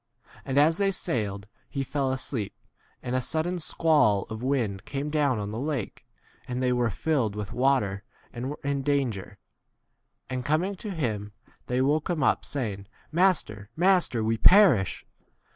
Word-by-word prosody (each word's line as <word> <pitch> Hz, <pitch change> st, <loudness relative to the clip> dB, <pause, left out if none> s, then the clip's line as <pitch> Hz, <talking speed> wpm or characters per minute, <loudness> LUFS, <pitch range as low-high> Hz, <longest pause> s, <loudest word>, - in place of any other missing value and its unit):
And 135 Hz, -, -2 dB
as 155 Hz, +3 st, +5 dB
they 200 Hz, -1 st, +3 dB
sailed, 105 Hz, -, -2 dB, 0.2 s
he 140 Hz, -1 st, -2 dB
fell 135 Hz, 0 st, -1 dB
asleep, 130 Hz, -5 st, -3 dB, 0.5 s
and 125 Hz, -, -2 dB
a 130 Hz, -, +1 dB
sudden 165 Hz, +6 st, -1 dB
squall 145 Hz, -11 st, +3 dB
of 110 Hz, +1 st, -5 dB
wind 120 Hz, -7 st, -1 dB
came 140 Hz, +4 st, -4 dB
down 145 Hz, -5 st, +2 dB
on 105 Hz, 0 st, -4 dB
the 110 Hz, -, -4 dB
lake, 140 Hz, -6 st, -4 dB, 0.4 s
and 125 Hz, 0 st, -3 dB
they 125 Hz, -1 st, +2 dB
were 120 Hz, -1 st, +1 dB
filled 115 Hz, -2 st, 0 dB
[with 105 Hz, -1 st, -5 dB
water], 120 Hz, -7 st, +1 dB, 0.3 s
and 120 Hz, +1 st, -5 dB
24 -, -, -2 dB
were 140 Hz, -, 0 dB
in 140 Hz, -1 st, -1 dB
danger; 130 Hz, -8 st, -1 dB, 0.9 s
and 130 Hz, -1 st, -3 dB
coming 160 Hz, +8 st, +1 dB
to 210 Hz, -, -6 dB
[him] 110 Hz, -, -3 dB, 0.3 s
they 125 Hz, +1 st, +1 dB
woke 150 Hz, +5 st, +1 dB
him 170 Hz, -3 st, 0 dB
up, -, -, +3 dB
Baying, 105 Hz, -8 st, -3 dB, 0.2 s
Master, 155 Hz, -, +1 dB
master, 175 Hz, -, +3 dB
we 115 Hz, +1 st, +1 dB
perish. 180 Hz, -, +5 dB
130 Hz, 160 wpm, -27 LUFS, 110-155 Hz, 0.9 s, as